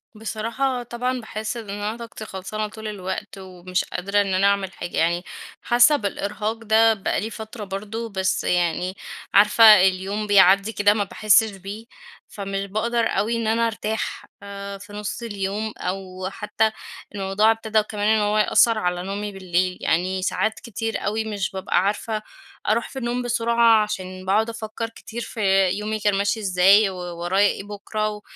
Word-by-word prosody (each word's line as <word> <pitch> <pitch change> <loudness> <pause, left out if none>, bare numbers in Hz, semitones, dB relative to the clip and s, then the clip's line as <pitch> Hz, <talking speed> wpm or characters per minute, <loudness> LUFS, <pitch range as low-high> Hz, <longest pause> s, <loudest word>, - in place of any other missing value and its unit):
بصراحة 230 +4 -2
طبعًا 250 +2 -2
باحس 220 +1 -5
إن 220 -3 -8
أنا 205 +3 -3
طاقتي 230 -2 -8
خلصانة 215 +2 -4
طول 220 +1 -8
الوقت، 195 0 -5
ومش 185 -1 -3
قادرة 200 +3 0
إن 195 -2 -1
أنا 195 +2 +3
أعمل 195 -2 0
حاجة، 175 - -6
يعني 175 +2 +1 0.4
حاسّه 240 +5 +5
بالإرهاق 210 -1 -2
ده 225 +1 +5
بقى 195 -2 -1
لي 220 - -3
فترة 220 0 -8
برضو، 210 +4 -5
بس 190 -1 -1
يعني 180 +1 0 0.4
عارفة 210 +3 +6 0.2
اليوم 195 +3 -2
بيعدي 195 +1 +5
كده 205 +1 +4
ما 210 -1 0
باحسش 215 +2 +3
بيه، 200 +4 -8 0.4
فمش 195 -1 -4
باقدر 230 +3 0
أوي 230 +3 0
إن 230 -1 -2
أنا 230 +1 +2
أرتاح 220 0 -3 0.2
آآ، 200 0 -7
في 205 +1 -13
نص 210 +3 -5
اليوم 205 0 -3
أو 185 0 -4
حتّى 220 0 0 0.4
الموضوع 195 +3 +2
ابتدَا 220 -1 +1
كمان 210 0 -3
إن 220 -1 +4
هو 210 +1 +1
يأثر 225 +1 +4
على 180 -3 -1
نومي 205 +2 -4
بالليل. 185 -1 -1
يعني 185 +3 0
ساعات 215 +3 -1
كتير 225 -2 -4
أوي 220 +2 -1
مش 205 -4 -3
بابقى 190 -1 0
عارفة 215 +1 -1 0.5
أروح 230 +2 +1
في 265 - -6
النوم 240 +1 -2
بسرعة، 235 -2 +3
عشان 185 -2 -6
باقعد 215 +4 +2
أفكّر 225 0 -5
كتير 230 +1 -8
في 195 -4 +2
يومي 215 +3 -2
كان 205 -1 +2
ماشي 205 +3 0
إزاي 195 +1 +5
وورايا 180 +2 0
إيه 195 - -3
بكرة، 210 +1 -3
و 210 0 -7
210 Hz, 165 wpm, -23 LUFS, 195-220 Hz, 0.5 s, عارفة